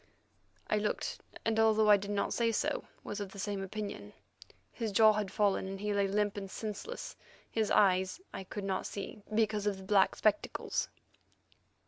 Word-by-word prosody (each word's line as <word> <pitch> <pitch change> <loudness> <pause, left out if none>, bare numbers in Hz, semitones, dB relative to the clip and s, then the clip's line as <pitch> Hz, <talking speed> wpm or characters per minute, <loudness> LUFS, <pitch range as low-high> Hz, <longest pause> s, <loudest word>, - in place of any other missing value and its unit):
I 215 - +2
looked, 210 0 -2 0.2
and, 225 0 +2
although 220 -1 +5
I 205 - +8
did 200 +1 -6
not 205 -1 0
say 230 -1 +2
so, 225 - -1 0.2
was 205 - -5
of 200 -2 -5
the - - -10
same 200 0 -2
opinion. 195 - -5 0.6
His 225 -2 -3
jaw 215 +1 +7
had 210 -2 -1
fallen, 200 -2 +1
and 195 0 -5
he 210 +1 -1
lay 200 -1 +2
limp 205 +1 0
and 195 -1 -5
senseless; 220 - -5 0.4
his 220 -2 +1
eyes 190 - +3
I - - -5
could 205 +2 -6
not 190 -1 -1
see, 200 +1 -6
because 215 -2 +1
of 200 -2 0
the 190 - -10
black 195 0 +4
spectacles. 210 -1 0
205 Hz, 175 wpm, -32 LUFS, 195-215 Hz, 0.6 s, I